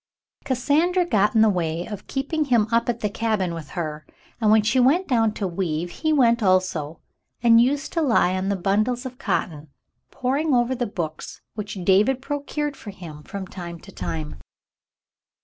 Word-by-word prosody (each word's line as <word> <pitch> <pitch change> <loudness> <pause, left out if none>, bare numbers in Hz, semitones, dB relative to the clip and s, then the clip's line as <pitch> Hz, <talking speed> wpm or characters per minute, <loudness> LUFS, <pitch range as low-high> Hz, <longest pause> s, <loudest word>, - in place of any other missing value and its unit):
Cassandra 305 +8 +2
got 210 - +2
in 220 - +5
the 220 - +6
way 170 -3 -1
of 205 -2 -8
keeping 290 +3 -1
him 240 -6 +3
up 230 +1 +2
at 235 -1 -2
the 210 - +1
cabin 210 -5 -1
with 160 -3 -7
her, 155 -2 -4 0.3
and 220 -2 +2
when 215 0 +5
she 215 +5 +2
went 295 +10 +3
down 225 -4 +2
to 200 - -2
weave, 175 -2 -2
he 315 - -1
went 235 -5 +4
also 185 -5 +1 0.4
and 230 -1 +7
used 275 +3 0
to 330 - +1
lie 225 - +3
on 190 +1 -1
the 200 - +1
bundles 215 +7 0
of 255 0 -7
cotton, 155 - -2 0.4
poring 275 +3 0
over 240 +1 +2
the 245 -1 -2
books 170 -7 -6
which 205 -4 -6
David 210 +8 +4
procured 290 +1 -3
for 215 - -10
him 170 -6 -10
from 195 +5 -6
time 170 -2 -8
to - - -13
time. 80 -4 -5
215 Hz, 180 wpm, -23 LUFS, 180-255 Hz, 0.4 s, and